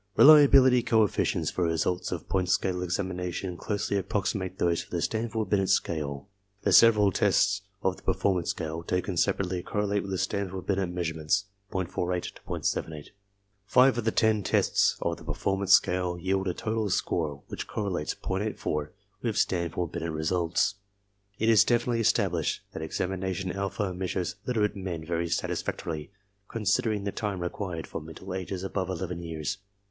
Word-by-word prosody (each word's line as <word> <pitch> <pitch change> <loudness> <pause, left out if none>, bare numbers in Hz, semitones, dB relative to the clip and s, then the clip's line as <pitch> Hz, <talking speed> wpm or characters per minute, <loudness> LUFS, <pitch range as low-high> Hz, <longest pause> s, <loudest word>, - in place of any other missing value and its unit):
Reliability 140 -4 +8
coefficients 110 -3 +1
for 90 - -1
results 85 +2 0
of 90 -3 -4
point 95 -2 0
scale 90 -1 +1
examination 90 0 -3
closely 100 +2 -2
approximate 95 -1 -2
those 85 -1 +1
for - - -13
the 85 - -2
Stanford 110 +1 -2
Binet 95 -2 +2
scale. 75 -6 -1 0.4
The - - +2
several 105 -3 +7
tests 100 +1 +2 0.2
of 95 -1 +1
the - - -15
performance 95 -2 0
scale, 80 +1 -3
taken 90 +2 -2
separately, 95 0 0
correlate 100 +2 -1
with 95 -2 -3
Stanford 95 -3 -2
Binet 95 -2 0
measurements, 85 +2 -1 0.3
.48 90 -1 -2
to - - -16
.78. 75 -2 -3 0.6
Five 130 +3 +6
^ - - -7
of - - -2
the - - +4
ten 110 -1 +2
tests - - +2
of - - -1
the - - -13
performance 95 0 +1
scale 90 -1 +3
yield 95 +2 -1
a 90 - -1
total 110 -1 -1
score 80 -4 0
I 70 - -18
which - - -5
correlates 95 -8 -2
.84 95 -6 -2 0.3
with 115 -3 -1
Stanford 85 -1 0
Binet 85 -1 -3
results. 85 +4 0 0.6
It 110 - 0
is 115 -2 +7
definitely 120 0 +1
established 95 -7 +1
that - - -5
examination 95 +3 -2
alpha 100 0 -2
measures 95 +1 -3
literate 110 -5 +1
men 90 -5 -5
very 85 0 -1
satisfactorily, 80 -2 -3 0.4
considering 105 -1 0
the 100 - -2
time 100 -4 -3
required, 90 -1 -4
for - - -6
mental 80 +4 -8
ages 95 0 -4
above 95 -1 -2
eleven 90 -2 -4
years. 85 +4 -4
95 Hz, 155 wpm, -28 LUFS, 85-100 Hz, 0.6 s, Reliability